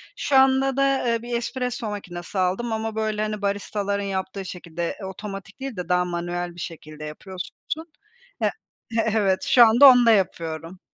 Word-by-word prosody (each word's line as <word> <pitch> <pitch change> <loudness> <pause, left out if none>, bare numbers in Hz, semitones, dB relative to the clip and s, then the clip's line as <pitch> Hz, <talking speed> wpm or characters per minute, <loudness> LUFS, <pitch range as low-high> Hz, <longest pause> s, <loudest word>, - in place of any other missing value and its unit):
Şu 285 - -1
anda 265 0 +4
da, 275 -2 +2
eee, 230 -1 +1
bir 240 0 -4
espresso 245 -2 -3
makinesi 185 -2 -5
aldım 190 +6 0
ama, 220 0 -3
böyle, 215 -1 -1
hani, 215 -1 -2
baristaların 200 0 -1
yaptığı 190 0 -3
şekilde 170 -2 -5
otomatik 195 +4 -8
değil 270 -3 -5
de 180 -1 -5
daha 180 0 +3
manuel 175 0 -3
bir 175 - -11
şekilde 155 -2 -8
yapıyorsun. 180 +5 -7 0.9
E - - +4 0.5
evet, 205 -4 +1
şu 240 -2 +7
anda 240 +5 +8
onda 245 -2 +6
yapıyorum. 170 -3 -1
200 Hz, 155 wpm, -24 LUFS, 180-235 Hz, 0.9 s, anda